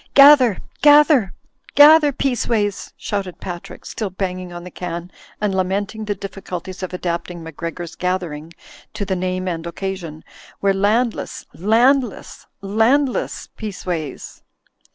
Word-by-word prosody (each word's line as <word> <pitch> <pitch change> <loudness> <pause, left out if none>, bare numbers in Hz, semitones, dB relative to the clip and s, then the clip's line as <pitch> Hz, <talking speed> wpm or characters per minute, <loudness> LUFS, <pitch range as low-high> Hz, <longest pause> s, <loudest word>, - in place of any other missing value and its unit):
''Gather, 275 -7 +8 0.2
gather, 290 - +6 0.4
gather, 300 0 +8
Peaceways," 230 -6 -1
shouted 195 -4 -4
Pat 175 -2 -7
rick, - - -12
still 215 -3 -4
banging 185 -1 -4
on 175 0 -8
the 180 - -9
can 175 0 -6 0.3
and 205 -2 0
lamenting 195 +3 -1
the 205 -1 -2
diffi 195 0 -8
culties 185 +1 -6
of 185 - -4
adapting 175 -1 -4
"Macgregor's 165 +1 -6
Gathering" 175 -4 -3 0.4
to 210 -1 -3
the 190 -1 -1
name 185 0 -2
and 170 -1 -3
occasion, 170 -3 -5 0.4
"We're 195 0 +2
landless, 215 +5 0
landless, 235 - +1
landless, 230 +7 +1
Peaceways 180 -8 -5
195 Hz, 125 wpm, -20 LUFS, 180-225 Hz, 0.4 s, Gather